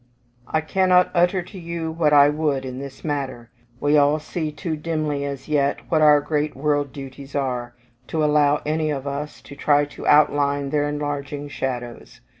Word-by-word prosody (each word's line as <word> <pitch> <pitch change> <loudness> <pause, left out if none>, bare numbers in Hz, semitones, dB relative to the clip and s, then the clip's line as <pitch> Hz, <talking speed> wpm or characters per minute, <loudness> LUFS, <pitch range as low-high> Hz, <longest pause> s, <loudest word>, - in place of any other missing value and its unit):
I 155 - 0
cannot 180 +2 +3
utter 180 +1 +2
to 190 +2 -11
you 170 -1 -4
what 160 -2 +1
I 145 -1 +7
would 145 -3 0
in 130 0 -6
this 140 -1 -9
matter; 135 -5 -4 0.3
we 145 +2 +3
all 145 +1 +4
see 155 +1 -4
too 160 +2 -4
dimly, 155 -2 -2
as 140 -2 -6
yet, 145 -2 +1
what 160 -2 +2
our 150 -1 +7
great 150 0 -1
world 145 0 0
duties 135 +1 -9
are, 125 -3 -2 0.3
to 160 -1 -1
allow 150 -1 +3
any 155 +1 0
of 140 -2 -3
us 145 +1 -5
to 140 - -11
try 145 0 +3
to 145 - -9
outline 145 -1 +3
their 145 -1 +1
enlarging 145 0 -4
shadows. 120 -3 -5
145 Hz, 175 wpm, -22 LUFS, 140-155 Hz, 0.3 s, I